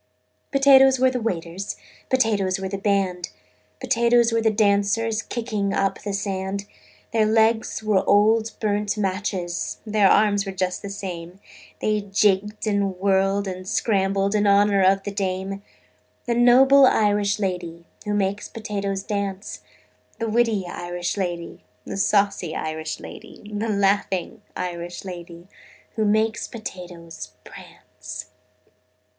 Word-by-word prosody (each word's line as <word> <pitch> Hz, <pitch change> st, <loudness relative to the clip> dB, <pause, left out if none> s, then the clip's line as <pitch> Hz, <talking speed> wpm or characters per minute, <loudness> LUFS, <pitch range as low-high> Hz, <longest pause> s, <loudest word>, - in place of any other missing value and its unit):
"Potatoes 270 Hz, -1 st, +6 dB
were 260 Hz, 0 st, +3 dB
the 250 Hz, -1 st, -3 dB
waiters, 185 Hz, -2 st, -3 dB, 0.3 s
Potatoes 210 Hz, -7 st, +1 dB
were 190 Hz, 0 st, -4 dB
the 195 Hz, +1 st, -4 dB
band, 195 Hz, -3 st, 0 dB, 0.5 s
Potatoes 235 Hz, -1 st, +3 dB
were 230 Hz, 0 st, +1 dB
the 220 Hz, -, +3 dB
dancers 215 Hz, +1 st, +1 dB
Kicking 215 Hz, -4 st, -3 dB
up 195 Hz, 0 st, 0 dB
the 205 Hz, -, -4 dB
sand: 195 Hz, 0 st, -3 dB, 0.5 s
Their 220 Hz, -2 st, +3 dB
legs 220 Hz, 0 st, +2 dB
were 210 Hz, -3 st, +2 dB
old 220 Hz, +2 st, +3 dB
burnt 210 Hz, -1 st, -1 dB
matches, 190 Hz, -3 st, -2 dB
Their 210 Hz, -2 st, +3 dB
arms 205 Hz, -1 st, +3 dB
were 195 Hz, -1 st, -6 dB
just 185 Hz, -1 st, -2 dB
the 200 Hz, -, -6 dB
same, 185 Hz, -2 st, -7 dB, 0.4 s
They 215 Hz, -1 st, +1 dB
jigged 205 Hz, +1 st, +1 dB
and 200 Hz, -3 st, 0 dB
whirled 195 Hz, +1 st, +1 dB
and 185 Hz, 0 st, -6 dB
scrambled 195 Hz, -2 st, +1 dB
In 210 Hz, -1 st, +2 dB
honor 200 Hz, 0 st, +4 dB
of 195 Hz, +1 st, +3 dB
the 205 Hz, -, -4 dB
dame: 195 Hz, 0 st, -3 dB, 0.6 s
The 240 Hz, -, 0 dB
noble 260 Hz, +3 st, +6 dB
Irish 205 Hz, -3 st, +2 dB
lady 175 Hz, -4 st, -4 dB, 0.2 s
Who 210 Hz, 0 st, -1 dB
makes 200 Hz, 0 st, -1 dB
potatoes 200 Hz, -3 st, -4 dB
dance, 200 Hz, -1 st, -4 dB, 0.6 s
The 230 Hz, -, -2 dB
witty 220 Hz, -3 st, +1 dB
Irish 175 Hz, 0 st, -4 dB
lady, 175 Hz, -4 st, -4 dB, 0.2 s
The -, -, -5 dB
saucy 200 Hz, -4 st, +1 dB
Irish 155 Hz, 0 st, -4 dB
lady, -, -, -11 dB
The 215 Hz, +2 st, -2 dB
laughing 200 Hz, 0 st, 0 dB
Irish 175 Hz, 0 st, -5 dB
lady 175 Hz, -1 st, -9 dB, 0.5 s
Who 220 Hz, -2 st, 0 dB
makes 220 Hz, +1 st, +1 dB
potatoes 175 Hz, -, -9 dB
prance. -, -, -11 dB
200 Hz, 130 wpm, -23 LUFS, 190-215 Hz, 0.6 s, Potatoes